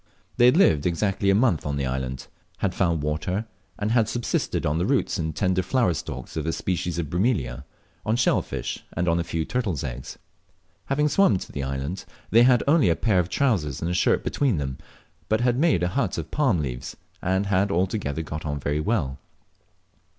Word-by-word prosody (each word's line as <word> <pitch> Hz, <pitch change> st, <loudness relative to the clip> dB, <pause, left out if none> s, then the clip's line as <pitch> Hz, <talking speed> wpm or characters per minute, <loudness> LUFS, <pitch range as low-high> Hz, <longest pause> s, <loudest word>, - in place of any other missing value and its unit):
They 120 Hz, -, +6 dB
had 125 Hz, +6 st, +6 dB
lived 80 Hz, -, +4 dB
exactly 100 Hz, +3 st, 0 dB
a 95 Hz, -, +5 dB
month 105 Hz, -, +2 dB
on 70 Hz, 0 st, -2 dB
the 70 Hz, -1 st, -1 dB
island 65 Hz, 0 st, -3 dB, 0.3 s
had 95 Hz, -2 st, -1 dB
found 85 Hz, -5 st, 0 dB
water, 80 Hz, +8 st, -2 dB, 0.3 s
and 105 Hz, +1 st, -1 dB
had 115 Hz, -2 st, +3 dB
subsisted 120 Hz, -1 st, -1 dB
on 75 Hz, +2 st, +1 dB
the 90 Hz, -, +1 dB
roots 130 Hz, -6 st, +1 dB
and 80 Hz, -2 st, -2 dB
tender 95 Hz, -1 st, +1 dB
flower 95 Hz, 0 st, +1 dB
stalks -, -, -6 dB
of 80 Hz, 0 st, -2 dB
a -, -, +2 dB
species 90 Hz, -2 st, -2 dB
of 85 Hz, -3 st, -2 dB
Bromelia, 75 Hz, -, -1 dB, 0.4 s
on 110 Hz, -, +1 dB
shell 120 Hz, -, +3 dB
fish -, -, -5 dB
and 90 Hz, +2 st, -1 dB
on 85 Hz, 0 st, +2 dB
a -, -, 0 dB
few 80 Hz, -1 st, -2 dB
turtles' 105 Hz, -, -2 dB
eggs. -, -, -6 dB, 0.7 s
Having 150 Hz, +2 st, +1 dB
swum 195 Hz, -, +4 dB
to -, -, -8 dB
the 70 Hz, -, -4 dB
island, 70 Hz, +7 st, -4 dB, 0.3 s
they 115 Hz, -, +6 dB
had 125 Hz, 0 st, +5 dB
only 150 Hz, -, +4 dB
a 85 Hz, -, +3 dB
pair 100 Hz, -2 st, +2 dB
of 90 Hz, -1 st, 0 dB
trousers 95 Hz, -, 0 dB
and 85 Hz, -, -2 dB
a -, -, 0 dB
shirt 90 Hz, -, +2 dB
between 135 Hz, -, +1 dB
them, 65 Hz, -3 st, -4 dB, 0.5 s
but 110 Hz, +1 st, +2 dB
had 125 Hz, 0 st, +2 dB
made 150 Hz, -, +3 dB
a 90 Hz, -, +1 dB
hut -, -, -1 dB
of -, -, -5 dB
palm 130 Hz, -, +2 dB
leaves, 60 Hz, -2 st, -5 dB, 0.2 s
and 95 Hz, +2 st, +1 dB
had 100 Hz, 0 st, +2 dB
altogether 90 Hz, -4 st, -1 dB
got 75 Hz, 0 st, -6 dB
on 75 Hz, -2 st, -3 dB
very 70 Hz, +3 st, -1 dB
well. 75 Hz, -, -1 dB
90 Hz, 200 wpm, -25 LUFS, 75-110 Hz, 0.7 s, They